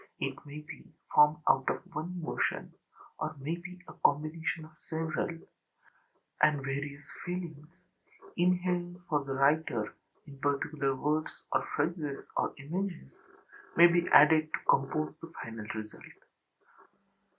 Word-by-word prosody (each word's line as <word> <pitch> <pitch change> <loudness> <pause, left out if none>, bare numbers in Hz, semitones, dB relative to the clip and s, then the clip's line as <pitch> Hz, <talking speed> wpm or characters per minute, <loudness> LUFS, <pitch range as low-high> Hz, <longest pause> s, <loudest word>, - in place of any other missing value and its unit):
It - - -1
may 150 +1 -7
be 150 - -11 0.3
formed 150 +2 +6
out 135 0 +4
of - - -2
one 175 +4 -4
emotion, 160 - -1 0.5
or 155 0 -2
may 145 +5 -2
be 180 +1 -9
a - - -10
combination 155 +2 +1
of 155 - -15
several; 160 -1 -2 1.1
and 150 -2 +4
various 140 +1 -4 0.2
feelings, 170 -4 -5 0.7
inhering 180 0 +1
for 150 -3 +1
the 135 -1 -3
writer 135 -5 +2 0.3
in 140 -2 -12
particular 140 -1 0
words 150 +3 -1
or - - +3
phrases 150 -2 -1
or - - +1
images, 170 - -4 0.6
may 170 - +10
be 175 0 +4
added 155 +1 +7
to - - -1
compose 155 +3 +2
the 165 - -9
final 110 -1 -7
result. 110 -1 -7
155 Hz, 130 wpm, -31 LUFS, 140-170 Hz, 1.1 s, may